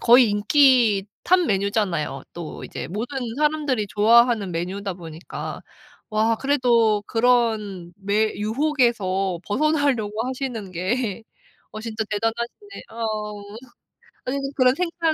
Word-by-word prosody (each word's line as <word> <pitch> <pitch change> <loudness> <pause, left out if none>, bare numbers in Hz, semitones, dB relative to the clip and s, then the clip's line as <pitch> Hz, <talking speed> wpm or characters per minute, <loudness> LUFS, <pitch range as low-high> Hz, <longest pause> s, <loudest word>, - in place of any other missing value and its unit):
거의 240 -1 +6
인기 225 -2 +4 0.2
탑 370 - +4
메뉴잖아요. 195 -8 -1
또 170 -2 -7
이제 - - -6
모든 230 - -4 0.2
사람들이 295 -7 0
좋아하는 225 0 +4
메뉴다 185 +3 -3
보니까 165 -1 -7 0.5
와 220 +1 +2
그래도 235 -6 +2
그런 220 -7 +1
매 210 +2 +1
유혹에서 215 - 0
벗어나려고 250 -4 0
하시는 255 -7 -4
게 200 +5 -2 0.5
어 215 - -5
진짜 220 -1 -3
대단하시네 235 - -3
어우 215 -2 -4 0.8
아유 260 +2 -1 0.2
그런 255 -1 +4
생각 335 -1 0
220 Hz, 260 characters per minute, -23 LUFS, 200-255 Hz, 0.8 s, 거의